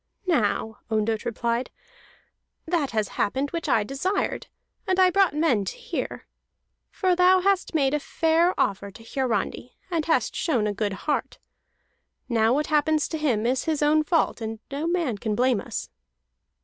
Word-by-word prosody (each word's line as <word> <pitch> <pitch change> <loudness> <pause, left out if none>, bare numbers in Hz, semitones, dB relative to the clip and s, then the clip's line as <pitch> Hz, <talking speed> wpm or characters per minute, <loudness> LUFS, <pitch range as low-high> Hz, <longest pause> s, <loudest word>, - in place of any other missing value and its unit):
"Now," 220 - 0
Ondott 220 0 0
replied, 235 +1 -1 1.0
"that 320 -5 0
has 215 -3 -1
happened 270 +7 0
which 335 -3 -3
I 220 - +3
desired, 275 - -2 0.4
and 375 0 +1
I 370 -1 +6
brought 385 -5 +3
men 300 -10 +2
to - - -5
hear. 485 - -5 0.6
For 370 -2 +1
thou 365 +1 +5
hast 390 -2 +1
made 275 -3 +2
a 300 - +2
fair 330 +4 +1
offer 200 0 0
to 225 +4 -14
Hiarandi, 240 -1 -2
and 330 -2 0
hast 320 - +1
shown 250 -10 0
a 210 - 0
good 205 -1 -2
heart. 300 - -1 0.9
Now 225 -2 +2
what 295 +4 +1
happens 305 0 +2
to 320 - -3
him 240 -8 +1
is 255 +2 0
his 310 -2 0
own 305 +1 +4
fault, 320 -6 +1
and 225 0 -4
no 290 +4 -2
man 335 - 0
can 215 -1 -2
blame 250 -2 +2
us." - - -6
280 Hz, 160 wpm, -25 LUFS, 225-330 Hz, 1.0 s, I